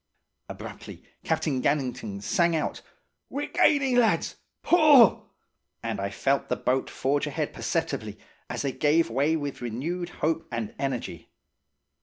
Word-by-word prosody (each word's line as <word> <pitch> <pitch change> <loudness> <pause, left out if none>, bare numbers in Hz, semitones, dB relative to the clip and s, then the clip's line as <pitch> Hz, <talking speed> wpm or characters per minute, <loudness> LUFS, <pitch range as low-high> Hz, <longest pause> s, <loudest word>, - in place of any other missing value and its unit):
"Abruptly - - -9 0.2
Captain 135 -4 0
Gannington 125 -8 -1
sang 170 - +2
out: 155 - -2 0.5
'We're 285 +1 -4
gaining, 270 -4 +3
lads. 235 -3 +2 0.3
Pull!' 300 - +6 0.5
And - - -3
I 100 0 -2
felt 135 +7 0
the - - +1
boat 130 +1 0
forge 140 +2 0
ahead - - -3
perceptibly, - - -2 0.3
as - - -3
they 140 - 0
gave 150 0 +2
way 140 +6 +2
with 145 -4 -4
renewed 155 +10 -3 0.2
hope 165 +1 0
and 115 -3 -4
energy. 125 - -4
145 Hz, 130 wpm, -26 LUFS, 125-175 Hz, 0.5 s, Pull